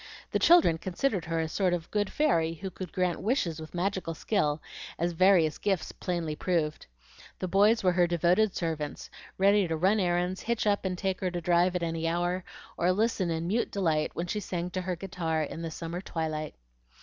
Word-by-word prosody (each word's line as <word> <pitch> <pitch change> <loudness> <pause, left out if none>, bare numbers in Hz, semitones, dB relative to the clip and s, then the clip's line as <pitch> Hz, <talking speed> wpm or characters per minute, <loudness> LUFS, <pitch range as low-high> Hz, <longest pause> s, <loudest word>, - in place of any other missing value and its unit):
The - - +1
children 330 - +5
considered 190 +2 -1
her 165 0 -1
a 160 - -1
sort 180 +2 0
of 170 -1 -8
good 205 -2 0
fairy 165 - +1
who 190 +3 -6
could 185 -1 -7
grant 180 -2 0
wishes 190 - 0
with 155 +2 -10
magical 180 -2 -2
skill, 155 -6 0 0.4
as 170 +2 0
various 175 -2 +4
gifts 195 -5 -1
plainly 170 -4 -3
proved. 155 -3 -1 0.5
The 185 - -3
boys 205 +5 +4
were 185 - +4
her 175 -1 +3
devoted 175 +5 +2
servants, 160 -3 -4 0.3
ready 200 0 +4
to 160 -1 -1
run 190 +6 +3
errands, 180 0 0
"hitch 235 -1 -1
up" 205 -1 +1
and 185 -1 -1
take 190 -1 -1
her 185 - 0
to 175 0 -3
drive 175 +1 +2
at 180 - -1
any 165 0 -1
hour, 175 +2 0 0.3
or 175 +2 +3
listen 200 -2 +1
in 165 0 -2
mute 215 +7 0
delight 160 -6 0
when 170 - -2
she 210 +4 -2
sang 180 -2 -4
to 185 - -2
her 180 0 -2
guitar 170 -3 -2
in 160 - -6
the 165 - -3
summer 165 +2 -5
twilight. 155 -4 -4
175 Hz, 195 wpm, -29 LUFS, 165-190 Hz, 0.5 s, children